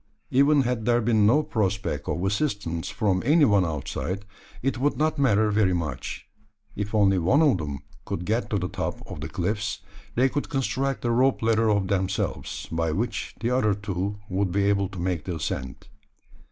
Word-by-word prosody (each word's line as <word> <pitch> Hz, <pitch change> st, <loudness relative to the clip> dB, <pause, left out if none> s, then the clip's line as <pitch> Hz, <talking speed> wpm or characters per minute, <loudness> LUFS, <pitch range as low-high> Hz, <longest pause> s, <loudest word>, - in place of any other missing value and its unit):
Even 140 Hz, +2 st, +5 dB
had 120 Hz, -3 st, -1 dB
there 120 Hz, 0 st, +3 dB
been 110 Hz, -3 st, +3 dB
no 145 Hz, +7 st, +4 dB
prospect 100 Hz, -9 st, -1 dB
of 90 Hz, -, -1 dB
assistance 100 Hz, -, -1 dB
from 95 Hz, -4 st, 0 dB
any 150 Hz, +4 st, +5 dB
one 100 Hz, -5 st, +4 dB
outside, 90 Hz, +5 st, -3 dB, 0.4 s
it 135 Hz, -1 st, 0 dB
would 145 Hz, +3 st, +1 dB
not 155 Hz, 0 st, +1 dB
matter 110 Hz, -5 st, +3 dB
very 100 Hz, -3 st, +3 dB
much. 70 Hz, -7 st, -4 dB, 0.5 s
If 105 Hz, +1 st, -3 dB
only 100 Hz, -3 st, +4 dB
one 130 Hz, -, +4 dB
of 135 Hz, -, +4 dB
them 75 Hz, -3 st, -4 dB, 0.3 s
could 90 Hz, -, -4 dB
get 115 Hz, +5 st, 0 dB
to 105 Hz, -, 0 dB
the 90 Hz, -2 st, -1 dB
top -, -, -4 dB
of -, -, -8 dB
the 80 Hz, -, -5 dB
cliffs, 105 Hz, +6 st, -2 dB, 0.3 s
they 125 Hz, +3 st, +4 dB
could 145 Hz, +2 st, -3 dB
construct 135 Hz, -1 st, -1 dB
a 120 Hz, -, +2 dB
rope 125 Hz, +1 st, +2 dB
ladder 115 Hz, 0 st, +3 dB
of 100 Hz, -2 st, +2 dB
themselves 95 Hz, -1 st, -2 dB
by 80 Hz, -1 st, 0 dB
which 110 Hz, +10 st, -3 dB
the 120 Hz, +1 st, 0 dB
other 110 Hz, -5 st, +2 dB
two 100 Hz, 0 st, -3 dB
would 95 Hz, -1 st, 0 dB
be 100 Hz, +2 st, +1 dB
able 100 Hz, -1 st, +2 dB
to 95 Hz, -, -10 dB
make 90 Hz, -3 st, -2 dB
the 90 Hz, -, -3 dB
ascent. 65 Hz, -4 st, -4 dB
105 Hz, 185 wpm, -25 LUFS, 95-120 Hz, 0.5 s, Even